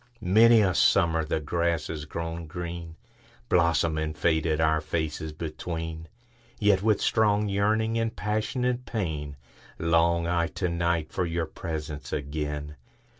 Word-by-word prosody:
Many 110 +5 +6
a 95 -3 +2
summer 80 -2 +3
the 80 +1 -1
grass 85 +1 0
has 75 -2 -5
grown 85 +1 -5
green, 85 0 -6 0.5
Blossomed 85 -2 +2
and 80 -1 -3
faded, 80 -2 +1
our 80 -1 +2
faces 80 0 -3
between:Yet, 95 +8 -3
with 105 -1 +2
strong 105 -2 +2
yearning 110 +3 +1
and 115 0 -1
passionate 125 +4 -1
pain, 75 - -3 0.4
Long 85 0 +2
I 85 -1 +1
to 90 0 -2
night 85 -2 0
for 90 - -1
your 85 0 -1
presence 75 -5 -6
again. 75 +1 -4
85 Hz, 125 wpm, -27 LUFS, 80-100 Hz, 0.5 s, Many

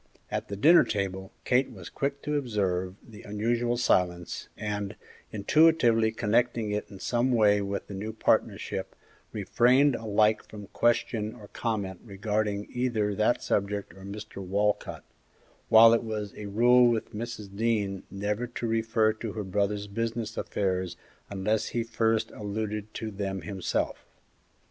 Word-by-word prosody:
At - - -2
the 100 - -5
dinner 165 - +7
table, 95 -2 -3
Kate 130 +1 +3
was 95 -6 -10
quick 140 0 -3
to 150 +1 -1
observe 95 -8 -1
the 110 -2 -12
unusual 120 +3 -1
silence, 90 -7 0
and, 105 -2 -3 0.4
intuitively 115 -1 +4
connecting 115 0 +1
it 105 +1 -3
in 100 -2 -11
some 120 +5 +1
way 105 -3 +4
with 100 0 -3
the - - -9
new 105 +3 -4
partnership, 110 - 0 0.4
refrained 125 +7 +3
alike 110 -1 +2
from 105 -1 -10
question 115 -2 +1
or 105 -4 -13
comment 100 -6 -3
regarding 105 0 -2
either 115 -5 0
that 110 +4 +1
subject 100 0 -1
or 95 - -13
Mr. 105 +2 -8
Walcott, 100 +3 -1 0.7
while 115 +1 +9
it 115 - +2
was 105 -2 -4
a 105 - -7
rule 120 +4 +5
with 115 0 -2
Mrs. 105 -3 -6
Dean 105 -3 0
never 105 +4 -2
to 120 0 -5
refer 110 -1 +2
to 110 -1 -6
her 110 - -4
brother's 100 +1 -1
business 115 +2 -3
affairs 95 -2 -2 0.3
unless 100 +2 0
he 120 - -1
first 115 -1 0
alluded 105 0 -4
to 110 -1 -4
them 95 -1 -3
himself. 95 -3 -2
105 Hz, 145 wpm, -28 LUFS, 100-115 Hz, 0.7 s, while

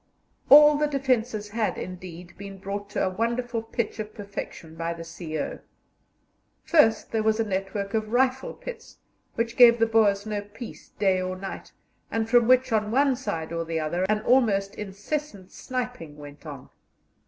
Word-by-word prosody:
All 295 +1 +9
the 300 - +2
defences 250 -6 -1
had, 220 +1 -1
indeed, 180 -1 -8
been 195 0 -9
brought 200 +1 -5
to - - 0
a - - +1
wonderful 235 +3 -1
pitch 225 0 -4
of 215 0 -6
perfection 200 -5 -7
by 165 +1 -3
the 165 - -8
C.O. 165 -2 -5 1.0
First 225 -10 +3
there 225 - +1
was 220 0 +1
a - - +3
network 195 0 -3
of 215 -1 -1
rifle 260 +2 +1
pits, 475 -2 -10 0.4
which 230 0 -1
gave 240 -1 +8
the 230 - +3
Boers 215 -3 +2
no 210 -1 -2
peace 205 +4 -11
day 190 -2 +1
or 185 0 -3
night, 195 +1 -8 0.4
and 225 0 -1
from 240 0 +4
which 255 0 +4
on 215 -1 +1
one 270 +3 +3
side 165 -10 -4
or 165 0 -1
the 165 0 -2
other 160 +4 -1
an 215 0 +2
almost 215 -5 +2
incessant 205 +1 -5
sniping 250 - -5
went 145 +1 -12
on. 140 -4 -9
210 Hz, 165 wpm, -26 LUFS, 185-240 Hz, 1.0 s, All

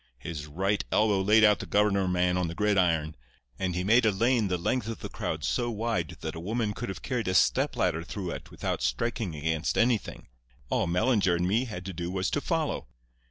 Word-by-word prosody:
His 75 +3 -6
right 95 +7 0
elbow 105 -2 +3
laid 105 +3 +5
out 105 -1 +5
the - - -6
governor 100 -2 +2
man 90 0 +1
on 90 -1 0
the 85 - -6
gridiron, 85 -7 +1 0.4
and 90 -2 -1
he 90 - -1
made 115 +6 +4
a 110 - +4
lane 115 +2 +2
the 90 -1 0
length 110 +7 -1
of 115 -2 -5
the - - -5
crowd - - -4
so 120 -1 0
wide 105 -8 -2
that 80 - -4
a - - -7
woman 105 +4 -1
could - - -5
have 95 - -7
carried 125 -5 -2
a 90 - 0
step 135 +8 +3
ladder 85 -2 0
through 90 0 -5
it - - -7
without - - -3
striking 85 - -1
against 80 +1 -1
anything. 115 -2 0 0.4
All - - +1
Mellinger 90 +1 +2
and 90 +1 0
me 110 +7 +2
had 90 -7 -7
to 95 - -5
do 85 0 -4
was 95 0 -1
to 145 - 0
follow. 160 -2 -1
95 Hz, 215 wpm, -28 LUFS, 85-110 Hz, 0.4 s, laid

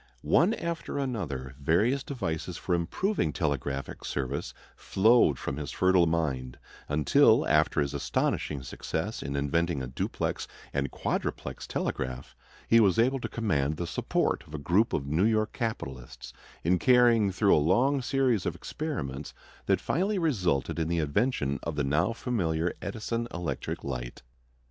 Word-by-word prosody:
One 190 +8 +4
after 170 -5 -4
another 85 - -3
various 110 - +2
devices 80 - -4
for - - -2
improving 85 - 0
telegraphic 70 -3 -3
service 70 -2 -3 0.2
flowed 115 +5 +4
from 70 - -4
his 75 -1 -4
fertile 95 -1 +3
mind, 70 -7 -1 0.3
until, 75 -2 +4
after - - +3
his 70 -1 0
astonishing 70 -3 -1
success 65 - -4
in 70 +1 -4
inventing 80 +3 0
a 65 - -3
duplex 65 - -3 0.3
and 70 -1 0
quadruplex - - -3
telegraph, 65 -1 -3 0.3
he 115 - +6
was 100 -6 +4
able 130 +4 +3
to - - -4
command 75 -10 0
the 85 - -2
support 85 - 0
of 80 - -8
a - - -2
group 90 +10 +2
of 70 - -1
New 75 +5 0
York 110 -1 +1
capitalists 65 - -5 0.3
in 90 +2 +2
carrying 120 -4 +5
through 100 +2 +4
a - - +4
long 125 - +3
series 125 -6 +1
of - - -2
experiments 75 - -5 0.3
that - - +3
finally 195 +4 0
resulted 95 - 0
in 80 - 0
the 85 +1 0
invention 75 - 0
of 85 - -4
the 75 - 0
now 75 +9 +2
familiar 90 -9 -1
Edison 115 +4 -3
electric 85 -1 -4
light. 60 -3 -5
85 Hz, 150 wpm, -28 LUFS, 70-115 Hz, 0.3 s, he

